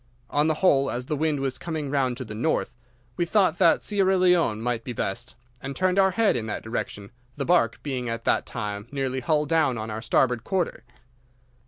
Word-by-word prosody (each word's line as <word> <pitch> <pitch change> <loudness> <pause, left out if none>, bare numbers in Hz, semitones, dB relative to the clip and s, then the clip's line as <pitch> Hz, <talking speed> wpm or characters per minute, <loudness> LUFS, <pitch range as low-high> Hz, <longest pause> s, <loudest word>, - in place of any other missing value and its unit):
On 150 +1 +2
the 160 - +2
whole, 140 -6 +3
as 125 +1 -3
the 150 - -2
wind 150 -1 0
was 135 -2 -2
coming 155 -5 -4
round 130 -4 0
to 130 - -5
the 110 - -7
north, 120 +9 -1 0.4
we - - +2
thought 190 -1 +2
that 170 -3 +4
Sierra 195 -2 +2
Leone 180 -11 +3
might 115 0 -2
be 125 - -5
best, 120 +4 -4 0.3
and 135 0 -5
turned 185 +1 +2
our 190 0 +5
head 210 +3 +2
in 115 -2 -2
that 105 - -4
direction, 105 -3 -5 0.3
the 140 - -2
barque 165 -10 +2
being 130 -4 -3
at 115 0 -4
that - - +1
time 105 +1 -5
nearly 135 -2 -2
hull 150 +4 +1
down 155 -5 +2
on 110 0 -5
our 110 +1 -4
starboard 120 0 +1
quarter. 185 0 -2
135 Hz, 205 wpm, -25 LUFS, 120-170 Hz, 0.4 s, our